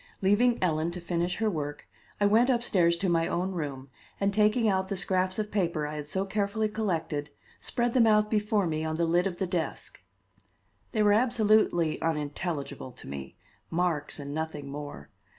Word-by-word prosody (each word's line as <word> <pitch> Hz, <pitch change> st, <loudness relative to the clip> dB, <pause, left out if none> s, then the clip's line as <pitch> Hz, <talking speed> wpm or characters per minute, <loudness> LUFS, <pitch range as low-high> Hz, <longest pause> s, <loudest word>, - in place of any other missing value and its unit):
Leaving 230 Hz, +5 st, +3 dB
Ellen 160 Hz, -2 st, +1 dB
to 175 Hz, +1 st, -6 dB
finish 175 Hz, +1 st, -1 dB
her 220 Hz, -, 0 dB
work, 145 Hz, -6 st, -3 dB, 0.3 s
I 205 Hz, -, +3 dB
went 225 Hz, +5 st, +4 dB
upstairs 190 Hz, -9 st, +3 dB
to 190 Hz, +3 st, -1 dB
my 165 Hz, -1 st, +2 dB
own 185 Hz, +2 st, -1 dB
room, 140 Hz, -6 st, -5 dB, 0.3 s
and, 200 Hz, 0 st, +1 dB
taking 215 Hz, +2 st, +3 dB
out 190 Hz, -2 st, +1 dB
the 200 Hz, -, -2 dB
scraps 185 Hz, 0 st, 0 dB
of 210 Hz, -1 st, -2 dB
paper 170 Hz, -7 st, 0 dB
I 150 Hz, -, -4 dB
had 150 Hz, -1 st, -6 dB
so 190 Hz, +4 st, -1 dB
carefully 210 Hz, +2 st, 0 dB
collected, 165 Hz, -8 st, -2 dB, 0.3 s
spread 240 Hz, 0 st, -1 dB
them 235 Hz, -3 st, +5 dB
out 210 Hz, -1 st, +4 dB
before 210 Hz, -2 st, +1 dB
me 155 Hz, -1 st, -1 dB
on 160 Hz, 0 st, -2 dB
the 170 Hz, +1 st, +1 dB
lid 175 Hz, +3 st, +2 dB
of 180 Hz, -2 st, -5 dB
the 190 Hz, -, 0 dB
desk. 175 Hz, -3 st, -4 dB, 0.9 s
They 215 Hz, -3 st, +2 dB
were 205 Hz, 0 st, +5 dB
absolutely 215 Hz, -8 st, +3 dB
unintelligible 150 Hz, -3 st, -3 dB
to -, -, -12 dB
me 70 Hz, 0 st, -7 dB, 0.3 s
marks 165 Hz, -4 st, -1 dB
and 140 Hz, 0 st, -6 dB
nothing 150 Hz, -3 st, -4 dB
more. 145 Hz, -, -8 dB
180 Hz, 180 wpm, -28 LUFS, 155-210 Hz, 0.9 s, them